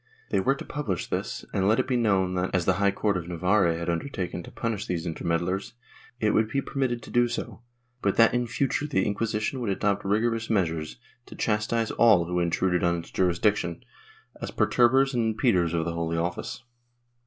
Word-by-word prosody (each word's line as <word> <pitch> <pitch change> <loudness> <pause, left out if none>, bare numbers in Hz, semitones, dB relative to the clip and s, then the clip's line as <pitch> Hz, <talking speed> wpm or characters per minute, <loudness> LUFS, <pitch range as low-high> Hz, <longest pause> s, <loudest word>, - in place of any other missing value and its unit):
They 100 - +2
were 135 +8 +2
to - - -8
publish 110 -12 -3
this - - -4
and 95 0 +1
let 110 +2 +3
it - - 0
be 130 - 0
known 100 -6 +2
that, 90 +1 -1
as 90 -2 +1
the 95 - +4
High 100 - +5
Court 100 0 0
of 85 -2 -5
Navarre 90 +1 +2
had 85 +1 -5
undertaken 90 0 -3
to - - -11
punish 110 -3 -3
these 85 -2 -2
intermeddlers, 85 +4 -2 0.5
it 105 -1 +2
would 110 0 +2
be 140 - 0
permitted 130 -3 -2
to - - -11
do 120 0 +3
so, 120 - -5 0.4
but 100 - +1
that 115 -1 +6
in 120 0 0
future 135 +4 -1
the 95 -11 +1
Inquisition 110 +4 -1
would 120 -4 -2
adopt 100 +1 0
rigorous 115 +3 0
measures 80 - -1 0.3
to - - -11
chastise 110 +1 0
all 105 -7 +5
who 90 +1 -1
intruded 90 +1 +1
on 85 0 +2
its 85 - -8
jurisdiction, 90 0 0 0.6
as - - -4
perturbers 135 +3 +3
and 110 -3 0
impeders 90 -10 +2
of 80 -1 0
the 85 - -2
Holy 85 0 -2
Office. 90 +7 -3
100 Hz, 195 wpm, -26 LUFS, 90-115 Hz, 0.6 s, that